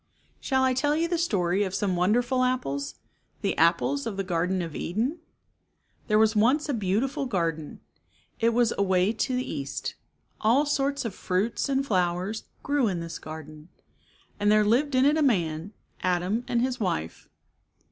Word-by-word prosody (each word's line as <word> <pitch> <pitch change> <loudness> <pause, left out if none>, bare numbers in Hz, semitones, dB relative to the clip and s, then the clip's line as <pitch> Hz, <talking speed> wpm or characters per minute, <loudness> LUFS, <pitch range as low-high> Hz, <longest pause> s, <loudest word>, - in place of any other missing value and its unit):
Shall 265 -1 +1
I 260 0 +3
tell 290 +3 +1
you 330 +2 +1
the 340 -1 -1
story 195 - +1
of 190 -1 -3
some 195 -2 0
wonderful 240 +8 +2
apples, 140 - -1 0.5
the - - 0
apples 140 -4 +2
of 200 - -4
the 195 - -1
Garden 180 0 0
of 165 -3 -7
Eden? 240 - -2 0.9
There 215 - +3
was 220 0 +4
once 255 +9 +3
a 290 - -1
beautiful 230 +6 -1
garden. 165 -8 -2 0.6
It 230 - +3
was 235 0 +2
away 190 +1 +2
to 255 +3 -1
the 255 - -2
east. 140 -1 -4 0.5
All 240 +7 +3
sorts 280 -2 0
of 225 - -3
fruits 195 +10 -1
and 275 0 +1
flowers 185 0 -1 0.2
grew 285 -4 +1
in 185 -4 -1
this 165 0 -6
garden. 155 0 -10 0.7
And 205 0 +3
there 215 0 +4
lived 260 +6 +2
in 255 +1 +4
it 295 +2 +4
a - - +2
man, 175 - +1 0.3
Adam, 185 +6 0
and 240 0 +1
his 255 -1 -1
wife. 85 - -3
210 Hz, 165 wpm, -26 LUFS, 175-255 Hz, 0.9 s, was